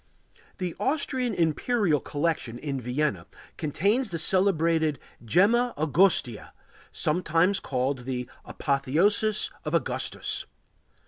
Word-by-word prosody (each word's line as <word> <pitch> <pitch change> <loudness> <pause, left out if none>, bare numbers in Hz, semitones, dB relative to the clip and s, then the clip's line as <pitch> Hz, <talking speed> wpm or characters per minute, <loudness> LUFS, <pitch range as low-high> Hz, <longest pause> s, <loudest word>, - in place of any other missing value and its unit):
The 180 -3 -4
Austrian 260 -5 -1
Imperial 170 - +1
Collection 145 -6 -2
in 135 0 -4
Vienna 125 - -2 0.3
contains 200 - 0
the 170 - -3
celebrated 165 -3 +2 0.3
Gemma 220 - +3
Augustea, 155 - +2 0.4
sometimes 170 +4 +1
called 130 +1 -2
the 125 -2 -3 0.2
Apotheosis 170 +10 +1
of - - -2
Augustus. - - -2
165 Hz, 90 wpm, -26 LUFS, 140-200 Hz, 0.4 s, Gemma